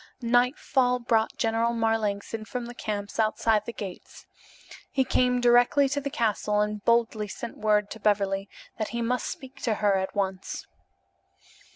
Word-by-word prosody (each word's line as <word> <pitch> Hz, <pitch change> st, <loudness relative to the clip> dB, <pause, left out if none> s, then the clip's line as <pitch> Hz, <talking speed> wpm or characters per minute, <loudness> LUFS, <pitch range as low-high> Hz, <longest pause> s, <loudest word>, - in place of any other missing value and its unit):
Nightfall 250 Hz, +1 st, +2 dB
brought 230 Hz, -2 st, 0 dB
General 225 Hz, +1 st, +1 dB
Marlanx 225 Hz, -3 st, -1 dB
in 225 Hz, -1 st, -3 dB
from 245 Hz, +2 st, -5 dB
the 240 Hz, -, -8 dB
camps 205 Hz, -2 st, -5 dB
outside 215 Hz, -1 st, +2 dB
the -, -, -2 dB
gates. 200 Hz, -5 st, -9 dB, 0.6 s
He 265 Hz, -, +1 dB
came 250 Hz, 0 st, +2 dB
direct 245 Hz, 0 st, +5 dB, 0.2 s
to 285 Hz, -1 st, 0 dB
the 280 Hz, -, -3 dB
castle 210 Hz, -4 st, 0 dB
and 210 Hz, 0 st, -1 dB
boldly 230 Hz, -2 st, +2 dB
sent 230 Hz, +4 st, -7 dB
word 210 Hz, -1 st, +2 dB
to 225 Hz, -, -7 dB
Beverly 200 Hz, -2 st, +1 dB, 0.3 s
that 215 Hz, -, -1 dB
he 235 Hz, 0 st, -3 dB
must 250 Hz, +2 st, -1 dB
speak 275 Hz, -4 st, -8 dB
to 225 Hz, -3 st, 0 dB
her 205 Hz, -2 st, +2 dB
at 190 Hz, 0 st, -3 dB
once. 190 Hz, -2 st, -3 dB
225 Hz, 160 wpm, -27 LUFS, 210-240 Hz, 0.6 s, direct